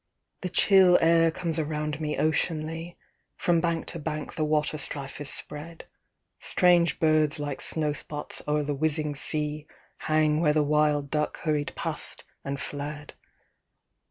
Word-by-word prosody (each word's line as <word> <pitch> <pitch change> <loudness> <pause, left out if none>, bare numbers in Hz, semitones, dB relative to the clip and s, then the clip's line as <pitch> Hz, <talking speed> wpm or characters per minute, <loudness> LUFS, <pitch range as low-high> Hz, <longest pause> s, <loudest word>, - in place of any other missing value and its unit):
The 180 - -3
chill 190 -1 +5
air 165 0 +4
comes 165 -1 -3
around 150 -1 -3
me 150 -1 -2
oceanly, 160 +2 -2 0.4
From 170 -2 +1
bank 170 -1 -1
to 170 - -6
bank 150 0 -5
the 160 - -2
waterstrife 150 -2 -3
is 145 - 0
spread; 160 +3 +2 0.5
Strange 175 -4 +2
birds 155 -2 +2
like 145 -2 -4
snowspots 150 -1 -2
oer 150 0 +1
the 145 0 -2
whizzing 150 +1 -1
sea 150 +1 +1 0.4
Hang 155 -1 +2
where 150 -3 +3
the 155 -1 +2
wild 150 -1 +1
duck 150 0 -1
hurried 150 -2 -1
past - - +1 0.2
and 140 0 -4
fled. 145 +1 -6
150 Hz, 135 wpm, -26 LUFS, 150-165 Hz, 0.5 s, chill